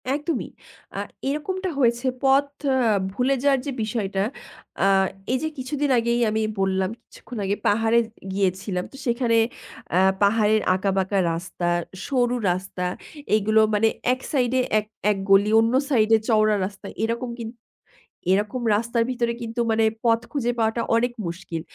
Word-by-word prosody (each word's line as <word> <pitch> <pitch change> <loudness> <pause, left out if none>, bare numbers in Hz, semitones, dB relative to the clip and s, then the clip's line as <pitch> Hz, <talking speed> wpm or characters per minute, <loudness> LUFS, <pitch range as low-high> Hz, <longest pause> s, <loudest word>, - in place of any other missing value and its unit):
একদমই। 295 -1 -3 0.5
আ - - -1 0.3
এরকমটা 370 +6 -2
হয়েছে। 240 0 +2 0.2
পথ 270 +1 +4 0.3
অ - - +2 0.4
ভুলে 255 +5 +1
যাওয়ার 280 -2 +4
যে 285 - -2
বিষয়টা, 200 -3 -1 0.6
আ - - +4 0.5
এই 255 - +2
যে - - +1
কিছুদিন 280 +3 -2
আগেই 235 +1 0
আমি 220 +1 0 0.2
বললাম 190 -1 +1
কিছুক্ষণ 240 - -11
আগে 200 +1 0
পাহাড়ে 225 +2 +3 0.3
গিয়েছিলাম। 190 -1 -1
তো - - -14
সেখানে 235 -1 +2 0.6
আ - - +5 0.2
পাহাড়ের 215 +1 +3
আঁকাবাঁকা 190 +1 0 0.2
রাস্তা, 175 +1 -4 0.4
সরু 250 -3 +1 0.2
রাস্তা 180 0 -4 0.5
এগুলো 215 +1 +3
মানে 210 +2 +3 0.3
এক 255 - -5
সাইডে 255 -2 +1 0.2
এক 210 - -6 0.3
এক 205 - -1
গলি 195 +2 +5
অন্য 225 +2 +2 0.2
সাইডে 225 -4 +4
চওড়া 215 -2 +3
রাস্তা। 200 +1 -8 0.2
এরকম 235 +2 -2
কিন্তু 230 +1 -7 0.7
এরকম 210 +6 0
রাস্তার 235 +2 0
ভিতরে 240 -2 0
কিন্তু 230 +1 -5
মানে 220 0 +3 0.2
পথ 230 -1 +4
খুঁজে 245 -4 0
পাওয়াটা 225 +1 +1
অনেক 240 +1 +1
মুশকিল। 170 -1 -5
225 Hz, 145 wpm, -23 LUFS, 200-250 Hz, 0.7 s, আ